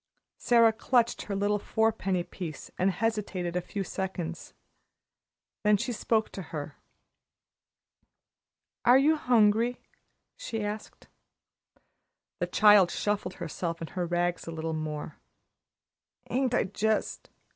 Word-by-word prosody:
Sara 230 Hz, -2 st, +5 dB
clutched 235 Hz, +1 st, +1 dB
her 200 Hz, -, -3 dB
little 205 Hz, +1 st, +1 dB
four 220 Hz, +2 st, +1 dB
penny 190 Hz, -4 st, -1 dB
piece, 175 Hz, -3 st, -8 dB
and 185 Hz, -, +2 dB
hesitated 195 Hz, -4 st, -2 dB
a 180 Hz, -, +1 dB
few 195 Hz, +3 st, -4 dB
seconds. 180 Hz, -3 st, -5 dB, 1.1 s
Then 210 Hz, -1 st, +5 dB
she 245 Hz, +5 st, -3 dB
spoke 220 Hz, 0 st, 0 dB
to 195 Hz, -, -6 dB
her. 150 Hz, -3 st, -7 dB, 2.1 s
"Are 245 Hz, +2 st, +7 dB
you 300 Hz, +4 st, +4 dB
hungry?" 235 Hz, -3 st, +3 dB, 0.6 s
she 230 Hz, -, -4 dB
asked. 210 Hz, +1 st, -7 dB, 1.3 s
The -, -, 0 dB
child 205 Hz, -4 st, +6 dB
shuffled 205 Hz, -1 st, -2 dB
herself 165 Hz, 0 st, -4 dB
and 165 Hz, -, -7 dB
her 180 Hz, -1 st, -2 dB
rags 175 Hz, 0 st, -1 dB
a -, -, -4 dB
little 160 Hz, 0 st, -3 dB
more. 155 Hz, -1 st, -5 dB, 1.1 s
"Ain't 255 Hz, -1 st, +1 dB
I -, -, +3 dB
jist!" 215 Hz, +2 st, -1 dB
200 Hz, 120 wpm, -28 LUFS, 175-225 Hz, 2.1 s, Are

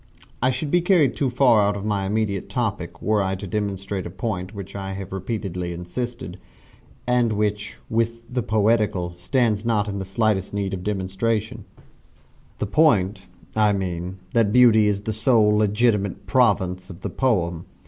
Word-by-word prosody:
I 130 Hz, -, +3 dB
should 130 Hz, +3 st, -2 dB
be 175 Hz, -, +4 dB
carried 170 Hz, -7 st, +3 dB
too 135 Hz, -, 0 dB
far 120 Hz, -4 st, +4 dB
out 100 Hz, 0 st, +1 dB
of 100 Hz, -, -6 dB
my 100 Hz, -2 st, -1 dB
immediate 105 Hz, -2 st, -1 dB
topic 105 Hz, -8 st, -3 dB
were 105 Hz, -1 st, +2 dB
I 95 Hz, 0 st, -1 dB
to 95 Hz, -, -7 dB
demonstrate 100 Hz, -1 st, -3 dB
a -, -, -7 dB
point 90 Hz, 0 st, -4 dB
upon 100 Hz, -, -13 dB
which 100 Hz, 0 st, -8 dB
I 95 Hz, -1 st, -4 dB
have 95 Hz, -1 st, -7 dB
repeatedly 95 Hz, -3 st, -4 dB
insisted, 90 Hz, +1 st, -5 dB, 0.7 s
and 120 Hz, -2 st, +2 dB
which, 105 Hz, 0 st, -2 dB
with 115 Hz, +1 st, -1 dB
the 125 Hz, +1 st, -2 dB
poetical, 105 Hz, -5 st, +1 dB
stands 110 Hz, +3 st, 0 dB
not 110 Hz, -3 st, +1 dB
in 100 Hz, -1 st, -3 dB
the -, -, -3 dB
slightest 100 Hz, -1 st, 0 dB
need 100 Hz, -1 st, -2 dB
of 90 Hz, -1 st, -4 dB
demonstration 105 Hz, +3 st, -2 dB, 0.9 s
the -, -, -2 dB
point, 100 Hz, -, +2 dB, 0.3 s
I 105 Hz, -1 st, +3 dB
mean, 90 Hz, -1 st, -3 dB, 0.2 s
that 115 Hz, -3 st, +3 dB
Beauty 110 Hz, -3 st, +6 dB
is 100 Hz, -1 st, 0 dB
the 110 Hz, -, -2 dB
sole 110 Hz, -1 st, +3 dB
legitimate 105 Hz, -1 st, +1 dB
province 90 Hz, 0 st, +1 dB
of 90 Hz, 0 st, -10 dB
the -, -, -4 dB
poem. 85 Hz, -10 st, 0 dB
105 Hz, 170 wpm, -23 LUFS, 95-115 Hz, 0.9 s, Beauty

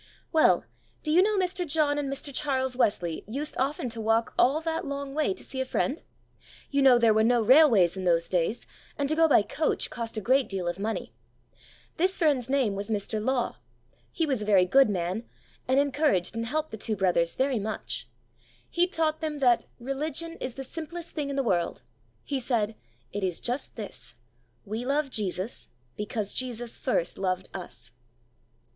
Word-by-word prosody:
Well, 315 Hz, -, +4 dB, 0.4 s
do 305 Hz, -, -1 dB
you 345 Hz, +4 st, +6 dB
know 420 Hz, +1 st, +2 dB
Mr. 365 Hz, -1 st, 0 dB
John 295 Hz, -2 st, +1 dB
and 280 Hz, -2 st, -2 dB
Mr. 275 Hz, +1 st, -5 dB
Charles 265 Hz, -2 st, 0 dB
Wesley 180 Hz, -9 st, 0 dB
used 285 Hz, +7 st, -3 dB
often 270 Hz, 0 st, 0 dB
to 230 Hz, -1 st, -4 dB
walk 225 Hz, +1 st, +1 dB
all 275 Hz, +5 st, +4 dB
that 325 Hz, 0 st, -2 dB
long 280 Hz, -1 st, -4 dB
way 310 Hz, +5 st, +1 dB
to -, -, -10 dB
see 260 Hz, -, -4 dB
a -, -, +2 dB
friend. 265 Hz, +3 st, -1 dB, 0.7 s
You 280 Hz, -1 st, +2 dB
know 265 Hz, -3 st, +7 dB
there 230 Hz, -2 st, +4 dB
were 220 Hz, 0 st, +3 dB
no 240 Hz, +1 st, +4 dB
railways 230 Hz, -, +6 dB
in 190 Hz, -, -5 dB
those 170 Hz, -2 st, +2 dB
days, 180 Hz, +6 st, 0 dB, 0.3 s
and 285 Hz, -, 0 dB
to 310 Hz, -, +2 dB
go 325 Hz, 0 st, +5 dB
by 280 Hz, -, +5 dB
coach 305 Hz, +8 st, -1 dB
cost 230 Hz, -1 st, -5 dB
a -, -, +1 dB
great 260 Hz, +5 st, +2 dB
deal 190 Hz, -3 st, -3 dB
of 175 Hz, +2 st, -2 dB
money. 220 Hz, +2 st, -3 dB, 0.8 s
This 375 Hz, +3 st, +1 dB
friend's 280 Hz, -7 st, +2 dB
name 265 Hz, -7 st, +2 dB
was 200 Hz, +2 st, -5 dB
Mr. 215 Hz, 0 st, -2 dB
Law; 255 Hz, 0 st, 0 dB, 0.5 s
he 330 Hz, -, 0 dB
was 265 Hz, -7 st, -1 dB
a -, -, -3 dB
very 195 Hz, -3 st, +5 dB
good 265 Hz, +6 st, +5 dB
man, 185 Hz, +3 st, -2 dB, 0.4 s
and 260 Hz, +2 st, +4 dB
encouraged 280 Hz, -, +1 dB
and 230 Hz, 0 st, -2 dB
helped 310 Hz, +4 st, -2 dB
the 220 Hz, -, -5 dB
two 215 Hz, +1 st, -1 dB
brothers 175 Hz, -3 st, +1 dB
very 260 Hz, -3 st, +1 dB
much. 215 Hz, +2 st, -4 dB, 0.6 s
He 350 Hz, +1 st, +3 dB
taught 315 Hz, -3 st, 0 dB
them 310 Hz, -2 st, -2 dB
that 245 Hz, -4 st, +3 dB
"religion 300 Hz, +6 st, -3 dB
is 255 Hz, -, -4 dB
the 270 Hz, -, -5 dB
simplest 330 Hz, +4 st, -7 dB
thing 295 Hz, -3 st, -2 dB
in 280 Hz, -, -3 dB
the 275 Hz, -, +1 dB
world." 175 Hz, -, 0 dB, 0.4 s
He 275 Hz, -, -2 dB
said: 225 Hz, -4 st, 0 dB, 0.4 s
"It 205 Hz, 0 st, -3 dB
is 180 Hz, -3 st, -1 dB
just 250 Hz, +3 st, -3 dB
this, 200 Hz, -, -6 dB, 0.5 s
'We 220 Hz, +4 st, -4 dB
love 280 Hz, +1 st, 0 dB
Jesus, 195 Hz, 0 st, -3 dB, 0.3 s
because 210 Hz, -1 st, -3 dB
Jesus 240 Hz, -2 st, -4 dB
first 175 Hz, -9 st, -1 dB
loved 185 Hz, -1 st, -1 dB
us.'" 125 Hz, -, -8 dB
255 Hz, 185 wpm, -27 LUFS, 210-290 Hz, 0.8 s, know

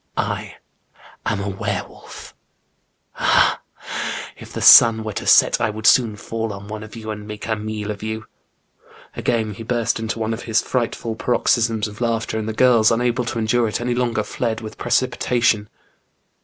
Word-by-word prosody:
I -, -, -3 dB, 0.7 s
am 105 Hz, -, 0 dB
a 100 Hz, -, -4 dB
were 95 Hz, -1 st, -3 dB
wolf! -, -, -13 dB, 0.9 s
Ah, -, -, +3 dB, 0.2 s
ha! -, -, -4 dB
if -, -, -13 dB
the -, -, -5 dB
sun 115 Hz, -1 st, +8 dB
were 110 Hz, -1 st, -5 dB
to -, -, -5 dB
set -, -, +5 dB
I 110 Hz, -2 st, +1 dB
wpuld 110 Hz, +1 st, -8 dB
soon 115 Hz, -4 st, +5 dB
fall 115 Hz, +1 st, -4 dB
on 100 Hz, +1 st, -10 dB
one 105 Hz, 0 st, -6 dB
of 110 Hz, +1 st, -10 dB
you 110 Hz, -1 st, -6 dB
and 105 Hz, 0 st, -8 dB
make 105 Hz, -1 st, -7 dB
a 110 Hz, -, 0 dB
meal 105 Hz, 0 st, -4 dB
of 100 Hz, -, -8 dB
you! 110 Hz, 0 st, -5 dB, 0.4 s
*' -, -, -25 dB
Again 110 Hz, -3 st, -1 dB
he 100 Hz, -, -10 dB
burst 115 Hz, 0 st, -1 dB
into 110 Hz, 0 st, -3 dB
one 110 Hz, 0 st, -2 dB
of 115 Hz, -, -6 dB
his 110 Hz, -1 st, +1 dB
frightful 115 Hz, -2 st, -2 dB
paroxysms 115 Hz, -2 st, +1 dB
of 105 Hz, +2 st, -11 dB
laughter, 115 Hz, -1 st, -1 dB
and 110 Hz, 0 st, -4 dB
the -, -, -3 dB
girls 115 Hz, -2 st, +4 dB
unable 120 Hz, +1 st, 0 dB
to 120 Hz, -, -4 dB
endure 115 Hz, +1 st, +1 dB
it 105 Hz, -, -2 dB
any 120 Hz, 0 st, -1 dB
longer, 120 Hz, -3 st, 0 dB
fled 110 Hz, +1 st, -3 dB
with 110 Hz, -1 st, -8 dB
precipitation. 120 Hz, -3 st, +1 dB
110 Hz, 185 wpm, -21 LUFS, 110-120 Hz, 0.9 s, sun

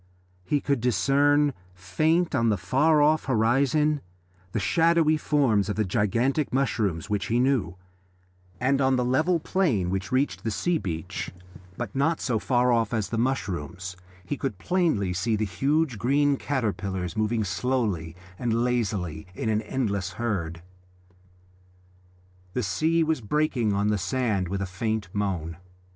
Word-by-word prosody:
He 145 Hz, +10 st, 0 dB
could 140 Hz, -4 st, 0 dB
discern, 140 Hz, +6 st, +3 dB, 0.2 s
faint 155 Hz, -, +1 dB
on 115 Hz, -4 st, +2 dB
the 105 Hz, -, +2 dB
far 150 Hz, -, +3 dB
off 155 Hz, +1 st, +3 dB
horizon, 135 Hz, +5 st, +2 dB, 0.5 s
the 110 Hz, -, -1 dB
shadowy 160 Hz, -, +3 dB
forms 130 Hz, -, +1 dB
of 100 Hz, -, -1 dB
the 110 Hz, -, 0 dB
gigantic 115 Hz, -, 0 dB
mushrooms 110 Hz, -11 st, 0 dB
which 105 Hz, -3 st, -1 dB
he 120 Hz, +2 st, +1 dB
knew, 125 Hz, -9 st, +1 dB, 0.8 s
and 135 Hz, +2 st, +2 dB
on 130 Hz, 0 st, +3 dB
the 125 Hz, -1 st, +1 dB
level 155 Hz, +8 st, +2 dB
plain 135 Hz, -, 0 dB
which 95 Hz, +1 st, -3 dB
reached 130 Hz, +3 st, 0 dB
the 115 Hz, -, -1 dB
sea 165 Hz, +10 st, 0 dB
beach, 80 Hz, -, -4 dB, 0.5 s
but 120 Hz, -5 st, -5 dB
not 155 Hz, +4 st, +1 dB
so 115 Hz, -5 st, 0 dB
far 125 Hz, +1 st, +2 dB
off 115 Hz, -1 st, +1 dB
as 110 Hz, -3 st, -1 dB
the 115 Hz, -, -2 dB
mushrooms, 90 Hz, -, -2 dB, 0.3 s
he 145 Hz, -, -3 dB
could 135 Hz, -9 st, -3 dB
plainly 155 Hz, -, 0 dB
see 95 Hz, +6 st, 0 dB
the 110 Hz, 0 st, 0 dB
huge 135 Hz, -, 0 dB
green 140 Hz, +5 st, +2 dB
caterpillars 100 Hz, -, -2 dB
moving 110 Hz, +1 st, 0 dB
slowly 100 Hz, -4 st, -1 dB, 0.2 s
and 115 Hz, -1 st, 0 dB
lazily 100 Hz, -10 st, -1 dB
in 110 Hz, -, -2 dB
an 110 Hz, 0 st, +1 dB
endless 100 Hz, -6 st, -2 dB
herd. 85 Hz, -6 st, -3 dB, 1.9 s
The 125 Hz, -, -1 dB
sea 160 Hz, -, +1 dB
was 160 Hz, -4 st, 0 dB
breaking 125 Hz, -2 st, 0 dB
on 100 Hz, +1 st, +1 dB
the 105 Hz, -1 st, +1 dB
sand 105 Hz, -2 st, 0 dB
with 100 Hz, +2 st, -2 dB
a -, -, -1 dB
faint 105 Hz, +2 st, -3 dB
moan. 90 Hz, -6 st, -2 dB
115 Hz, 150 wpm, -26 LUFS, 100-140 Hz, 1.9 s, discern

